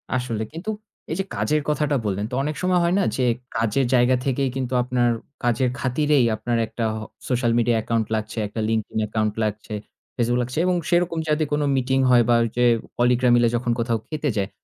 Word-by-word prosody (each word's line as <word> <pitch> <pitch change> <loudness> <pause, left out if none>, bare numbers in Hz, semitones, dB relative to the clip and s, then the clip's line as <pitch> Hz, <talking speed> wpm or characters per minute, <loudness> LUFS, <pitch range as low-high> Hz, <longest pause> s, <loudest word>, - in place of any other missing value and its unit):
আসলে 120 -3 -2
কিন্তু, 170 +7 -6 0.4
এই - - 0
যে 195 - +1
কাজের 150 0 +1
কথাটা 150 -1 +1
বললেন 100 0 -1
তো 125 - -2
অনেক 150 +1 -2
সময় 180 0 +2
হয় 170 - +2
না - - +2
যে, 130 - 0 0.4
কাজের 115 +4 +1
জায়গা 125 0 +4
থেকেই 135 0 0
কিন্তু 130 -1 -3
আপনার 125 -1 +1 0.3
কাজের 120 +1 +2
খাতিরেই 140 +1 +2
আপনার 115 +2 -1
একটা 115 - -5
আ 110 - -4 0.3
social 120 -2 +1
media 120 0 +2
account 115 0 0
লাগছে, 110 +2 -4
একটা 110 - -6
LinkedIn 110 -1 -1
account 110 -1 -1
লাগছে, 105 0 -4 0.4
Facebook 120 0 +1
লাগছে। 125 +3 -6
এবং 180 0 +2
সেরকম 175 -1 +1
যাতে 155 +1 +2
কোন 150 0 +1
meeting 130 0 +1
হয় 120 -1 +6
বা 120 - +5
ওই 115 - -1
যে 125 - +3 0.3
কলিগ 120 0 +3
-রা 125 - +5
মিলে 120 -1 +4
যখন 120 0 0
কোথাও 115 -1 +1
খেতে 155 -1 -2
যায়। 100 0 0
125 Hz, 200 wpm, -23 LUFS, 115-145 Hz, 0.4 s, হয়